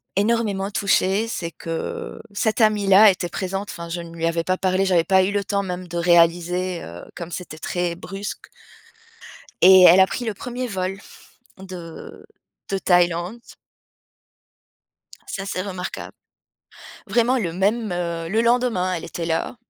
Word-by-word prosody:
énormément 205 -2 0
touchée, 200 +2 +1
c'est 170 -7 -4
que 165 0 -6
cette 215 +3 0
amie-là 210 -1 +6
était 180 -2 -4
présente, 195 +3 -4
enfin, 170 -1 -8
je 170 +1 -4
ne 170 0 -11
lui 165 0 -2
avais 165 0 -1
pas 185 +2 0
parlé, 190 +1 +1
j'avais 175 -3 +3
pas 190 +2 +4
eu 190 - 0
le 205 0 -1
temps 200 0 -1
même 180 -1 -5
de 175 0 -5
réaliser, 175 +1 +2
heu, 85 +1 -9
comme 170 0 -7
c'était 160 -3 -7
très 175 0 -2
brusque. 195 +5 -7 1.1
Et 190 0 +8
elle 180 +1 +8
a 190 - +6
pris 245 - -4
le 220 - -2
1er 250 +4 -5
vol 190 -2 -3 0.6
de 180 -4 -10 0.4
de 195 - 0
Thaïlande. 175 +3 +1 1.9
Ça, 195 - -5
c'est 185 - -3
remarquable. 185 -2 -6 0.9
Vraiment 235 +5 +2
le 175 -8 -2
même, 205 +4 0
heu, 170 -2 -3
le 220 +4 +2
lendemain, 235 -6 +1
elle 170 - -4
était 170 - -5
là 165 +8 -2
185 Hz, 150 wpm, -22 LUFS, 175-200 Hz, 1.9 s, Et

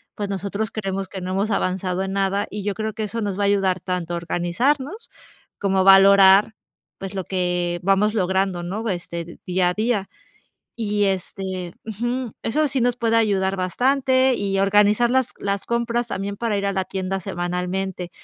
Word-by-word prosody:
pues 205 -1 -4
nosotros 200 +2 -3
creemos 195 -2 -3
que 190 0 -7
no 180 +1 -4
hemos 200 +3 0
avanzado 185 -1 -1
en 195 0 -4
nada 195 +1 0
y 205 0 -5
yo 205 0 -1
creo 220 0 -3
que 220 +1 -4
eso 225 +2 -3
nos 200 -3 -2
va - - +1
a - - +3
ayudar 195 -2 +2
tanto 180 -2 -3
a - - -1
organizarnos 260 - -1 0.5
como 195 -1 0
a - - +4
valorar, 195 +2 +7 0.4
pues, 195 0 -6
lo 190 - -2
que 180 -2 -1
vamos 195 +3 +3
logrando, 190 -2 0
¿no? 205 +6 -4
Este, 170 -2 -5
día 180 -1 +2
a - - -1
día. 215 -3 0 0.7
Y 210 -2 0
este, 185 -2 -3
ujú, 240 +3 -3
eso 300 +7 +1
sí 270 - -1
nos 245 0 +2
puede 230 -1 +2
ayudar 195 -3 +1
bastante 260 +7 +2
y 195 -2 -1
organizar 210 +4 +4
las 260 -1 +2
las 200 0 -2
compras 235 0 -1
también 200 -2 -4
para 225 -2 -1
ir 200 - -2
a 200 - +1
la 190 0 -1
tienda 190 0 -3
semanalmente. 180 0 -3
195 Hz, 180 wpm, -22 LUFS, 185-220 Hz, 0.7 s, valorar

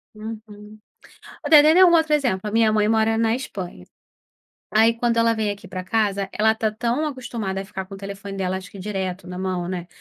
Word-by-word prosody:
Uhum. 215 -1 -10 0.7
O - - -2
de 300 -2 +8
dei 315 +5 +6
um 350 - +5
outro 320 -2 +3
exemplo. 255 -10 +1
A - - -6
minha 225 -1 +3
mãe 210 -1 +2
mora 225 0 +2
na 225 0 +2
Espanha. 185 - -7 0.9
Aí 225 +2 +4
quando 235 0 0
ela 230 0 +3
vem 215 -2 -1
aqui 205 0 -7
pra 185 0 -6
casa, 200 -1 0
ela 220 +1 +2
tá 220 0 -1
tão 235 +7 -1
acostumada 230 -8 -4
a - - -6
ficar 190 -1 -7
com 195 - -10
o - - -8
telefone 195 0 -7
dela, 190 -1 -2
acho 190 0 -9
que 200 - -12
direto 190 -2 -4
na 180 0 -7
mão, 185 -2 -3
né, 180 -2 -4
215 Hz, 215 wpm, -22 LUFS, 190-230 Hz, 0.9 s, de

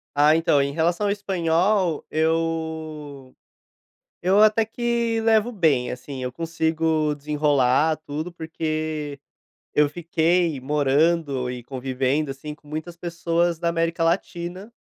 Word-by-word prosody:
Ah, 150 +2 +5
então, 160 -3 +3
em 140 0 0
relação 170 +6 +1
ao 200 - +2
espanhol, 185 -2 +1
eu 160 -4 -2 0.9
eu 190 +4 +4
até 215 +1 +5
que 235 0 -1
levo 225 +1 +3
bem, 155 - +2
assim, 130 +1 -7
eu 125 - -3
consigo 160 0 0
desenrolar 145 0 +2
tudo 155 +3 -5
porque 155 -3 -3 0.6
eu 150 0 +4
fiquei 170 0 +1
morando 145 -1 +1
e 125 -1 -6
convivendo, 135 +3 -1
assim, 145 +3 -7
com 150 - -25
muitas 155 +3 -6
pessoas 170 0 -1
da 170 - 0
América 165 0 0
Latina, 175 +4 -2
160 Hz, 120 wpm, -23 LUFS, 145-170 Hz, 0.9 s, Ah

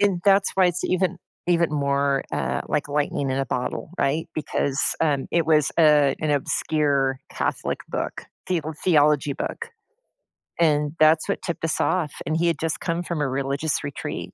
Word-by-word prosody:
and 200 -4 +2
that's 195 0 +4
why 190 -1 +4
it's 175 0 -1
even 185 -1 0 0.3
even 170 -2 +2
more, 140 -1 +1
uh, 65 -2 -1
like 150 - 0
lightning 145 -1 -1
in 130 - -1
a 135 - -1
bottle. 125 +4 -3
Right? 145 +4 0
Because, 140 -2 -2 0.2
um, 145 -4 +1
it 170 -2 +2
was, 155 -3 +3
uh, 150 -3 +5
an 155 - 0
obscure 140 -1 +1
Catholic - - -2
book, - - -4 0.2
theo 160 -4 -1
theology 150 -4 +3
book, 465 - -5 0.9
and 150 -3 +2
that's 155 +3 +4
what 200 - -1
tipped 170 - -5
us 160 - 0
off. 170 -5 +1
And 155 +3 -1
he 170 +1 +1
had 165 -3 0
just 160 -1 -2
come 170 +1 -2
from 170 -3 -3
a 145 - +1
religious 140 +3 -1
retreat. 145 -1 -5
150 Hz, 170 wpm, -24 LUFS, 140-170 Hz, 0.9 s, uh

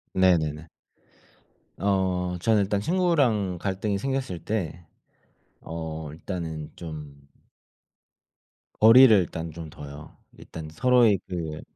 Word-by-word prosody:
네네네. 80 -4 +2 1.1
어 95 -2 0
저는 110 +1 +3
일단 100 +1 0
친구랑 130 - +1
갈등이 100 +2 -2
생겼을 135 -6 -3
때 90 -5 -3 0.8
어 80 -2 -6
일단은 80 -2 -6
좀 75 -4 -9 1.5
거리를 115 +1 +8
일단 85 -2 -3
좀 80 0 -8
둬요. 75 0 -11 0.2
일단 80 -1 -9
서로의 120 +2 +4
그 80 -4 -5
90 Hz, 190 characters per minute, -25 LUFS, 80-105 Hz, 1.5 s, 거리를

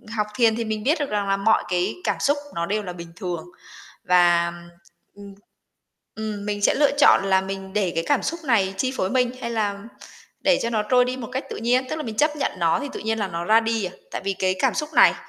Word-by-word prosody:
học 210 -1 0
thiền 230 -3 +3
thì 230 -1 -2
mình 215 -1 -3
biết 305 +4 +2
được 290 - -2
rằng 205 -1 -1
là 195 0 +1
mọi 220 +3 +3
cái 180 0 0
cảm - - -1
xúc 285 +1 +2 0.2
nó 170 0 -1
đều 210 +3 -1
là 180 -2 -6
bình 170 -1 -10
thường. 180 - -5 0.6
Và, 175 -1 +4 0.6
ừm, 205 0 -12
ừm, 200 - -11 1.0
ừm, 205 0 -7
mình 205 0 -2
sẽ - - +4
lựa 290 -1 +3
chọn 195 - +6
là 190 -1 +3
mình 190 0 -6
để 195 -4 0
cái 165 - -1
cảm 290 - +2
xúc 335 +1 -3
này 195 -7 +2
chi 260 +5 -1
phối 185 - -1
mình, 250 -2 +2
hay 235 - -4
làm 205 -1 -2 0.5
để 280 - +3
cho 235 - -1
nó 215 -2 0
trôi 250 +3 +3
đi 255 +1 -3
một 235 -4 -7
cách 265 - -3
tự - - -5
nhiên, 250 +3 +1
tức 315 - -2
là 310 - -4
mình 225 -5 -5
chấp 300 +2 +2
nhận 275 - -1
nó 165 -1 +2
thì 285 - -4
tự - - -6
nhiên 225 +1 -1
là 200 -2 -1
nó 170 -1 -4
ra 220 +3 +5
đi 225 -2 -1
à, 180 - -4 0.2
tại - - -5
vì 195 - 0
cái 185 0 +1
cảm - - +2
xúc 300 -1 -2
này - - +7
210 Hz, 260 wpm, -23 LUFS, 190-250 Hz, 1.0 s, này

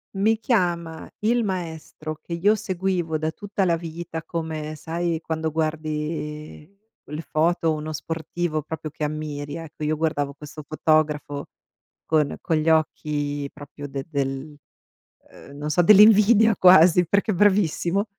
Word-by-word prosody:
Mi 215 +3 +2
chiama 175 -8 -1
il 235 +3 +2
maestro, 160 -5 -5
che 170 - -7
io 190 +5 +3
seguivo 185 -5 -1
da 155 +1 -2
tutta 205 +2 -2
la 170 - +3
vita, 165 0 -6
come 155 -1 -5
sai, 165 +2 -2
quando 160 -1 -2
guardi 155 +1 -4 0.3
quelle 150 +2 -6
foto 165 +1 +1
o - - +2
uno 155 0 -5
sportivo, 160 +1 -3
proprio 155 0 -6
che 150 - -3
ammiri. 150 -1 -5
Ecco, 165 -2 -8
io 155 +1 0
guardavo 145 -3 -1
questo 150 +1 -10
fotografo, 150 -2 0 0.6
con 155 -3 +1
con 160 - 0
gli 155 +1 +1
occhi 145 -2 0
proprio 145 0 -9
de 135 -1 -5
de - - -35 0.2
del 135 +3 -6 0.9
uhm, 140 - -12
non 150 +1 -3
so, 165 - +3
dell'invidia 215 +3 +7
quasi, 180 -1 +6
perché 200 +5 +1
è - - -1
bravissimo. 195 -1 +2
160 Hz, 145 wpm, -24 LUFS, 150-180 Hz, 0.9 s, dell'invidia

